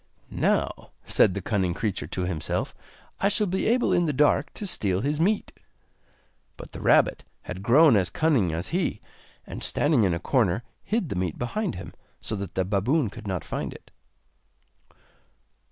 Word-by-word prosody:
'Now,' - - 0 0.2
said 95 - +3
the 100 - -4
cunning 95 -5 0
creature 105 -4 -3
to 95 - -3
himself, 85 -4 -2 0.5
'I 200 - +3
shall 210 +1 +1
be 190 0 -1
able 240 +3 +2
in 175 -1 +2
the 150 - 0
dark 145 +1 +2
to 210 - -6
steal 100 - +1
his 145 +4 -1
meat!' 200 +5 +1 1.1
But - - -10
the - - -8
rabbit - - +3 0.2
had 90 +1 -7
grown 135 +6 +6
as 95 -3 +2
cunning 140 - +2
as 80 +2 -1
he, 170 - -1 0.5
and - - -7
standing 145 -6 +2
in 90 -4 +2
a - - -3
corner 115 -1 +1 0.2
hid 210 -7 -1
the - - -3
meat 90 -3 -2
behind 195 - -2
him, 95 - -8 0.3
so 110 - -4
that 100 -2 -6
the 95 - +1
baboon 105 - +1
could 110 -1 -10
not 90 -4 -2
find - - -4
it. - - -16
115 Hz, 170 wpm, -26 LUFS, -, 1.1 s, grown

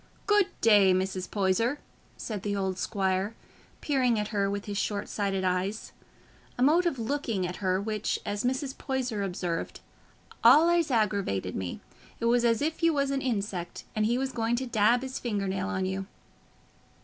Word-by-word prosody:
"Good 415 -2 +4
day, 205 -4 +6
Mrs. 185 0 -2
Poyser," 210 +7 +1 0.4
said 210 -4 -5
the 205 0 -2
old 190 -2 -2
squire, 195 +1 -1 0.5
peering 255 -5 +2
at 210 0 -2
her 200 -2 0
with 200 0 -3
his 205 -1 -3
short 205 -1 -2
sighted 195 -2 -1
eyes—a 190 +6 -4
mode 335 +6 +4
of 330 - -1
looking 230 -5 -1
at 180 0 -5
her 185 -2 0
which, 215 +1 -1
as 205 0 -2
Mrs. 265 +2 -1
Poyser 255 -5 -2
observed, 180 -3 -3 0.6
"allays 335 +1 +6
aggravated 200 - 0
me: 90 -2 -4 0.4
it - - -2
was 240 +1 +3
as 235 +2 +2
if 320 +2 -2
you 330 -1 +4
was 280 -1 +1
a 275 - 0
insect, 200 -8 -3
and 215 0 +2
he 240 +2 +1
was 265 0 -1
going 230 -1 0
to 260 +2 -2
dab 235 +1 +3
his 260 0 -4
finger 205 -5 -2
nail 190 0 -2
on 190 -2 -1
you." 190 +1 -3
210 Hz, 170 wpm, -28 LUFS, 190-255 Hz, 0.6 s, day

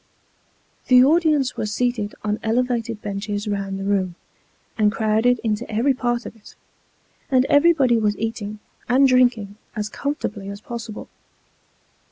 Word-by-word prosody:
The 250 -1 +7
audience 300 -3 +2
were 215 - -3
seated 215 -1 -1
on 210 0 -1
elevated 230 -1 -1
benches 205 +1 -4
round 200 -1 -3
the - - -4
room, 195 -3 0 0.6
and 210 -2 +3
crowded 225 +2 +2
into 220 +1 -2
every 240 +6 +2
part 240 -1 -2
of - - -8
it; 220 - -17 0.7
and 260 -1 +3
everybody 285 -6 +4
was 210 -1 0
eating 215 -1 -4 0.3
and 265 +3 +5
drinking 245 -6 +2 0.2
as 210 -1 -3
com 285 +6 -3
fortably 200 -7 -5
as 200 - -8
possible. 230 -1 -7
225 Hz, 140 wpm, -22 LUFS, 210-250 Hz, 0.7 s, The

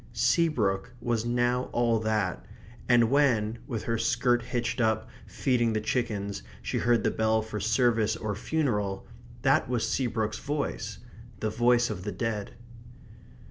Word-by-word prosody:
Seabrook 120 - +1
was 115 -1 -1
now 120 +1 +1
all 120 -2 +2
that; 110 -1 -1 0.5
and 120 -1 +5
when, 120 -6 +2
with 115 -6 -3
her 115 -1 -1
skirt 120 +1 +2
hitched 120 +1 -2
up, 110 -1 +1 0.2
feeding 120 -4 +1
the 110 - +1
chickens, 105 - -2 0.2
she - - -1
heard 120 0 +2
the - - +2
bell 110 0 +1
for 110 -1 -5
service 110 0 +2
or 110 -2 -3
funeral, 105 -6 -1 0.4
that - - +3
was 120 -3 0
Seabrook's 110 -4 -1
voice 145 0 -3 0.4
the 110 - -1
voice 120 +1 +3
of 90 -4 -5
the 105 - -3
dead. 105 +1 -3
115 Hz, 140 wpm, -28 LUFS, 110-120 Hz, 0.5 s, and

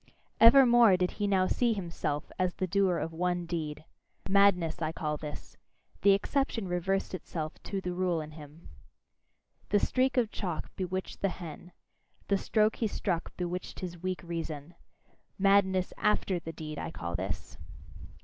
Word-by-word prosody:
Evermore 235 -4 +8
did 180 0 0
he 205 -1 -2
now 190 -2 +3
see 235 +4 +2
himself 170 -6 -3
as 185 -1 +1
the 185 - -1
doer 185 -1 +2
of 165 0 -3
one 175 +1 -1
deed. 155 -3 -4 0.4
Madness, 190 -4 +3
I 155 -1 0
call 155 -2 -2
this: 150 0 -8 0.4
the 200 0 +6
exception 225 0 0
reversed 180 +3 -1
itself 160 -3 -5
to 195 - -3
the 180 -1 -3
rule 180 -2 0
in 155 0 -6
him. 150 +1 -13 1.0
The 205 - +4
streak 260 +5 +1
of 230 -3 +2
chalk 175 -6 -4
bewitcheth 185 0 -4
the 195 - +1
hen; 175 -1 -8 0.6
the 200 - +4
stroke 215 +1 +2
he 225 - +1
struck 180 -4 -3
bewitched 180 0 -4
his 175 -2 -6
weak 185 0 -3
reason. 165 -2 -5 0.6
Madness 190 -2 +3
AFTER 200 -3 +1
the 165 0 -7
deed, 155 -2 -7
I - - -4
call 85 0 -5
this. 90 -2 -5
180 Hz, 155 wpm, -30 LUFS, 165-200 Hz, 1.0 s, Evermore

